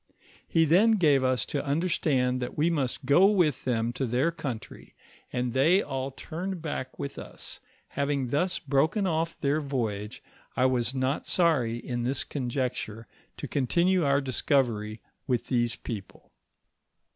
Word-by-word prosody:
He 165 -1 +3
then 195 +9 +5
gave 150 -10 +4
us 130 -1 +1
to 145 - -2
understand 140 -5 +1
that 125 - -5
we 160 +3 +3
must 135 -6 -2
go 175 +7 +6
with 175 -10 +1
them 120 -2 0
to 130 +1 -2
their 130 +8 +1
country, 130 -9 -7 0.4
and 125 -1 -2
they 165 +9 +4
all 135 0 -3
turned 175 +7 -5
back 150 -5 -5
with 140 - -5
us; - - -7 0.3
having 140 -3 -1
thus 175 +7 +1
broken 160 +9 +1
off 165 -1 -1
their 145 +1 +1
voyage, 115 -5 -3 0.3
I 125 - +3
was 125 0 +1
not 130 +2 -1
sorry 135 -10 +2
in 120 0 -4
this 130 +3 0
conjuncture 125 -4 -3 0.3
to - - -5
continue 170 +7 +2
our 140 0 +3
discovery 120 -4 0 0.3
with 125 -3 -1
these 120 -2 +1
people. 105 -5 -8
135 Hz, 145 wpm, -28 LUFS, 125-160 Hz, 0.4 s, go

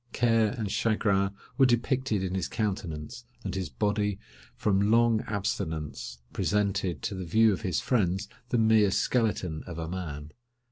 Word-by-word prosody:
Care 115 -2 +3
and 105 -4 -2
chagrin 100 -3 +2 0.3
were 135 - +7
depicted 120 -3 +1
in 95 -1 -2
his 95 -3 -1
countenance, 105 +1 -3 0.2
and - - -3
his 95 -3 -3
body, 105 -1 0 0.4
from 100 0 +2
long 115 -1 +4
abstinence, 80 - -3 0.2
presented 100 -7 0
to 100 - -2
the 95 -1 -4
view 110 +5 +4
of - - -4
his 90 -7 0
friends 95 -5 0 0.2
the 120 - +1
mere 110 -2 +5
skeleton 95 -7 0
of 85 -2 -6
a 80 -1 -3
man. 75 -4 -5
100 Hz, 150 wpm, -28 LUFS, 90-110 Hz, 0.4 s, were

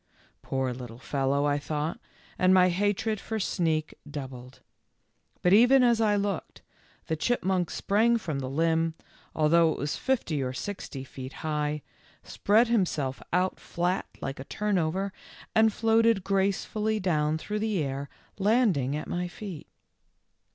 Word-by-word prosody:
" - - -36
Poor 130 -1 -2
little 120 -2 -8
fellow," 140 +2 0
I 145 0 +1
thought, 150 +2 -3 0.4
and 185 +1 +5
my 185 0 +6
hatred 205 +4 0
for 220 +1 -4
Sneak 160 -5 0 0.2
doubled. 130 -3 -8 0.8
But 180 - +5
even 245 +5 +7
as 235 -2 +4
I 210 -2 +3
looked, 200 -3 -3 0.4
the 160 - -1
chipmunk 185 -2 0
sprang 225 +4 +2
from 160 -10 -3
the 130 -1 -4
limb, 165 +2 +1 0.4
although 160 +1 +4
it - - -4
was 145 +1 -2
fifty 230 - 0
or 130 -1 -2
sixty 145 -5 -5
feet 130 0 -9
high, 150 -1 -1 0.4
spread 220 +4 +3
himself 165 - 0
out 180 +2 +1
flat 180 +2 -1
like 135 0 -4
a - - -5
turnover, 195 -1 -1 0.4
and 220 0 +5
floated 225 -2 +3
gracefully 200 +3 0
down 155 -5 +1
through 210 +6 -4
the 210 -6 0
air, 140 0 -4 0.3
landing 195 - +2
at 150 - -4
my 180 0 -2
feet. 180 -3 -8
175 Hz, 145 wpm, -28 LUFS, 145-210 Hz, 0.8 s, even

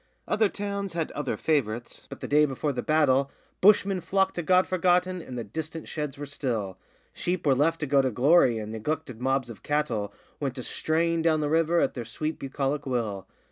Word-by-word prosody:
Other 215 0 +2
towns 200 -2 -4
had 165 -2 -2
other 145 -2 -3
favourites, 120 -7 -1
but - - -9
the - - -4
day 150 +1 +5
before 140 +1 -2
the 125 - -2
battle 140 -3 +3 0.3
Bushmen 195 -1 +5
flocked 190 +1 +1
to 175 - -3
God 185 +2 +4
Forgotten, 180 0 +1
and 125 -5 -8
the 120 - -3
distant 155 +8 -6
sheds 150 -3 -4
were 145 - -5
still; 115 -9 -3 0.3
Sheep 180 -1 -2
were 140 - +5
left 160 +5 +1
to - - 0
go 140 -1 +4
to 130 - +1
glory, 130 0 +4
and 110 0 -5
neglected 125 +2 -4
mobs 130 -2 0
of 105 - -12
cattle 125 -9 -1 0.3
Went 135 -2 -3
a 125 - -4
straying 165 +4 0
down 160 -1 +2
the 145 - 0
river 165 +2 +3
at - - +1
their 120 - -5
sweet 155 +7 -4
bucolic 140 +1 -2
will. 110 -7 -2
150 Hz, 200 wpm, -27 LUFS, 125-165 Hz, 0.3 s, day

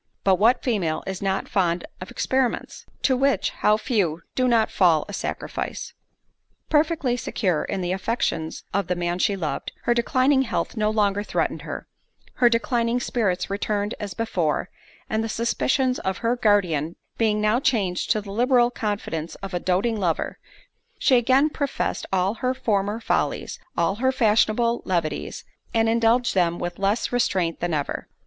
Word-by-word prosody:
But 190 -2 +3
what 230 +5 +4
female 190 -11 0
is 190 -1 -4
not 195 -1 -1
fond 175 -3 0 0.2
of 185 - -7
experiments? 260 -2 -1 0.2
To 260 - +3
which, 275 +1 +1
how 210 0 +2
few 190 - 0
do 255 -1 +1
not 230 -2 +3
fall 170 -5 +3
a 205 - -8
sacrifice! - - -4 0.8
Perfectly 300 -5 +2
secure 185 -8 -1
in 195 - -3
the 175 0 -1
affections 185 -5 -2
of 200 -3 0
the 180 - 0
man 175 0 -2
she 200 +1 +2
loved, 165 -6 -3
her 240 - +3
declining 255 +3 +3
health 260 - -2
no 215 -1 +1
longer 205 -2 +1
threatened 210 - -1
her; - - -6 0.5
her 240 - +5
declining 235 0 +1
spirits 205 -7 -1
returned 205 +1 -1
as 200 -3 -5
before; 180 -9 -1 0.4
and 220 0 -1
the 225 - -3
suspicions 250 +3 +1
of 190 0 -2
her 235 +2 +3
guardian 180 -9 +2 0.2
being 215 -2 +2
now 215 +3 +2
changed 205 -10 0
to 215 - +2
the 200 -1 -9
liberal 240 +2 +3
confidence 205 -8 -3
of 195 -1 -8
a 175 - 0
doting 200 +6 0
lover, 170 -5 -1 0.6
she 260 - +4
again 260 +4 +4
professed 285 -2 -2
all 190 +1 +2
her 255 0 +1
former 205 -2 0
follies, 230 - -1 0.2
all 170 +4 +1
her 260 +3 +2
fashionable 230 -1 +2
levities, 165 -5 -2 0.3
and 225 0 +3
indulged 230 +1 +3
them 175 -2 +2
with 175 +1 -5
less 200 +4 0
restraint 190 -9 0
than 175 0 -1
ever. 145 -1 -3
210 Hz, 160 wpm, -24 LUFS, 185-240 Hz, 0.8 s, her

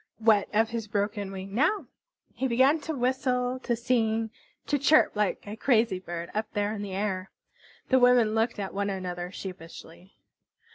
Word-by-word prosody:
What 220 -3 +3
of 220 +1 +2
his 230 -2 -4
broken 205 -1 -2
wing 195 0 -7
now? 310 - +1 0.5
He 265 - -1
began 260 +6 +4
to 315 +1 -4
whistle, 255 0 0
to 240 -2 -1
sing, 225 -2 0 0.3
to 290 - 0
chirrup 300 +3 +4
like 210 -2 -1
a 205 +1 -6
crazy 225 -5 +2
bird 170 -1 -6
up 215 +1 -2
there 205 0 0
in 210 - -5
the 195 -2 -5
air. 190 -2 -2 0.6
The 260 - +5
women 245 -3 +5
looked 225 +1 0
at 195 -2 -4
one 200 +1 -1
another 180 -2 -4
sheepishly. 180 -1 -10
220 Hz, 165 wpm, -27 LUFS, 195-250 Hz, 0.6 s, The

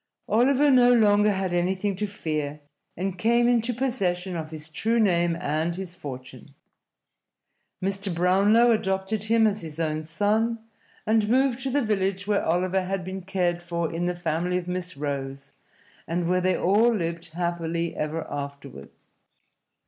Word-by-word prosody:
Oliver 275 +5 +4
no 245 -1 +6
longer 210 -3 +4
had 190 -2 -2
anything 185 +3 0
to 210 +1 -1
fear, 155 -6 -4 0.4
and 185 0 -3
came 235 +3 +3
into 240 0 +2
possession 195 -8 -1
of 160 -2 -4
his 155 -1 -7
true 225 +9 0
name 175 -5 +2
and 160 +1 -1
his 185 -1 -5
fortune. 130 -6 -9 1.3
Mr. 195 0 -2
Brownlow 195 +7 +4
adopted 195 0 -1
him 225 +1 +3
as 210 0 0
his 160 -1 -8
own 155 -1 -1
son, 210 +8 0 0.5
and 220 -1 +2
moved 260 0 +2
to 270 - -2
the 280 +1 +1
village 195 -2 -1
where 205 -1 +1
Oliver 180 +3 +1
had 190 -1 -3
been 190 +1 -5
cared 180 -2 -1
for 170 -1 -3
in 175 +1 -1
the 180 - -1
family 175 +1 -1
of 180 -1 -5
Miss 180 -2 -4
Rose, 140 -1 -4 0.6
and 170 +1 -1
where 180 +1 +2
they 185 0 +1
all 215 +6 +3
lived 170 -5 -3
happily 170 -1 -2
ever 155 +2 -3
afterward. 140 - -7
185 Hz, 155 wpm, -25 LUFS, 165-210 Hz, 1.3 s, no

